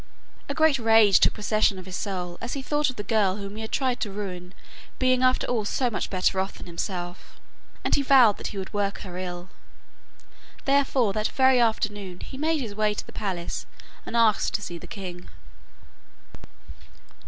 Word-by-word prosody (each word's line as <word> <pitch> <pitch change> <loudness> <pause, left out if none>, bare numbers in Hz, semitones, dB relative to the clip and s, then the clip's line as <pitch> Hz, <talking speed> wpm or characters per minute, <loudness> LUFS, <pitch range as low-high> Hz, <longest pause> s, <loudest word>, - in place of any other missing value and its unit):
A 280 - -2
great 315 -3 +4
rage 225 -4 +6
took - - +4
possession 210 -2 +1
of 185 - -9
his 185 -1 -6
soul 180 -4 -4
as 240 - -4
he 275 - -4
thought 295 +1 +1
of 255 - -5
the 205 - -5
girl 200 -2 +2
whom 200 -1 -7
he 220 - -6
had 220 - -6
tried 260 -3 0
to 205 - -3
ruin 185 -3 -6 0.4
being 255 -1 +3
after 255 0 +3
all 235 -3 0
so 245 +4 0
much 205 - -3
better 190 0 +1
off 190 +1 -2
than - - -10
himself, 175 0 -6 0.4
and - - 0
he - - +4
vowed 260 -6 +6
that - - -5
he 205 - -7
would 190 -1 -6
work 200 -1 -1
her 180 -2 -7
ill. 180 0 -6 1.2
Therefore 270 -6 +2
that 215 +1 0
very 260 -1 +4
afternoon 205 -5 -1
he - - -9
made 310 +2 0
his 220 -5 -5
way 210 0 +1
to - - -5
the - - -12
palace 185 -4 -4 0.4
and 235 - -3
asked 225 -3 +3
to - - -1
see 175 -3 -6
the - - -11
king. 180 -3 -8
210 Hz, 190 wpm, -26 LUFS, 190-250 Hz, 1.2 s, rage